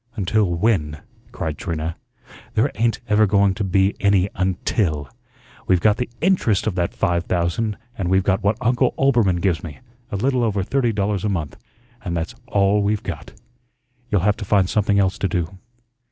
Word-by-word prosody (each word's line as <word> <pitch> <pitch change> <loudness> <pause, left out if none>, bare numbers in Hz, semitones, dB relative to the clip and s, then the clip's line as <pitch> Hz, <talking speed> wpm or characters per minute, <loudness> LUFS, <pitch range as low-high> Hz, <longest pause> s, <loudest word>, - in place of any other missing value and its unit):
"Until 100 -2 +1
WHEN?" 85 -7 0 0.3
cried 80 -2 -4
Trina. 80 -2 -3 0.6
"There - - +2
ain't 115 +2 0
ever 105 0 +4
going 100 0 +3
to 105 - -3
be 95 +1 +2
any 100 -1 +3
'until.' 90 -4 -1 0.6
We've 90 -2 +4
got 105 +3 +3
the 125 - -3
INTEREST 160 - +2
of 110 - 0
that 85 -1 -2
five 85 0 0
thousand 95 +5 -1 0.2
and 95 -5 -2
we've 95 0 +3
got 95 +1 +1
what 100 +2 +1
Uncle 125 +1 +2
Oelbermann 115 -10 +2
gives 90 -5 +1
me, 80 -5 -8 0.3
a - - -2
little 125 +4 +1
over 105 -4 0
thirty 125 +2 +1
dollars 100 -2 -1
a 105 - 0
month, 80 -8 -3 0.5
and 85 -3 -2
that's 80 +5 -3
all 100 -2 +2
we've 105 +1 0
got. - - -7 0.8
You'll 100 -5 +2
have 105 +2 +2
to - - -6
find 100 -2 +2
something 100 0 +1
else 95 -1 +1
to 100 - +1
do." 90 +1 -3
100 Hz, 180 wpm, -21 LUFS, 90-105 Hz, 0.8 s, ever